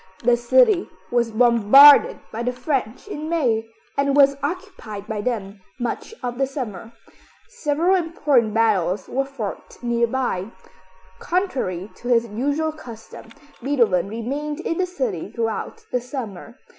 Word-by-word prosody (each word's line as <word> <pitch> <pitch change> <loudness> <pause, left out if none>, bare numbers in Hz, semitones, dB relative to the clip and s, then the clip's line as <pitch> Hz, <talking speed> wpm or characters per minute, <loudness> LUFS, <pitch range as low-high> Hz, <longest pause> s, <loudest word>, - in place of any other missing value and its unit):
The 240 +1 +4
city 370 - +3 0.2
was 240 -1 +2
bombarded 240 +5 +7
by 225 - -4
the 250 +1 0
French 250 - -3
in 310 -6 -5
May, 235 -9 0 0.3
and 280 0 +1
was 280 -1 +6
occupied 290 - -5
by 215 -1 -4
them 205 -4 -4 0.2
much 245 - -4
of 245 0 -4
the 270 - +2
summer. 230 -6 -6 0.6
Several 345 -6 0
important 295 - +1
battles 205 -5 +1
were 270 +2 -1
fought 255 -7 -7
nearby. 235 -4 0 0.7
Contrary 255 - -2
to 245 - -9
his 235 -1 +3
usual 285 +9 -1
custom, 235 -7 -12 0.3
Beethoven 230 -9 +2
remained 280 +7 -4
in 330 0 -2
the 370 - +1
city 235 - -3
throughout 230 - -4
the 250 - 0
summer. 235 -4 -7
245 Hz, 130 wpm, -22 LUFS, 225-290 Hz, 0.7 s, bombarded